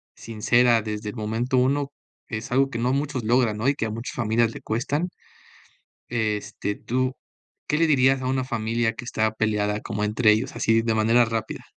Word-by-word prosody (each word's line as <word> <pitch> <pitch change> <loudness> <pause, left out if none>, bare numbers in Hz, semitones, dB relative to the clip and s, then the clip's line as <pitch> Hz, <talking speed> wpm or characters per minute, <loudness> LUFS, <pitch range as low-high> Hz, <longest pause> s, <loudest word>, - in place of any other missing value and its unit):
sincera 115 +1 +2
desde 105 0 -4
el - - -8
momento 115 +4 -1
uno, 140 +2 +1 0.4
es 110 0 -5
algo 135 +2 +3
que 115 - -4
no 125 +2 +1
muchos 140 -3 -2
logran, 115 -2 +2
¿no? 110 +4 -1
Y 140 - +3
que 115 - -2
a - - -2
muchas 115 +3 -6
familias 115 0 +1
le - - -9
cuestan. 145 +10 -1 1.0
Este, 105 -3 -2
tú, 130 +2 -1 0.5
¿qué 150 - +1
le 165 - +4
dirías 135 -2 +3
a 130 - -2
una 130 0 0
familia 115 -1 -1
que 125 - -8
está 110 -2 0
peleada 105 -1 0
como 105 -2 -3
entre 105 +1 +3
ellos? 125 +8 0
Así, 115 0 +2
de 115 -1 0
manera 115 +3 +4
rápida. 110 -1 -4
115 Hz, 190 wpm, -24 LUFS, 110-130 Hz, 1.0 s, le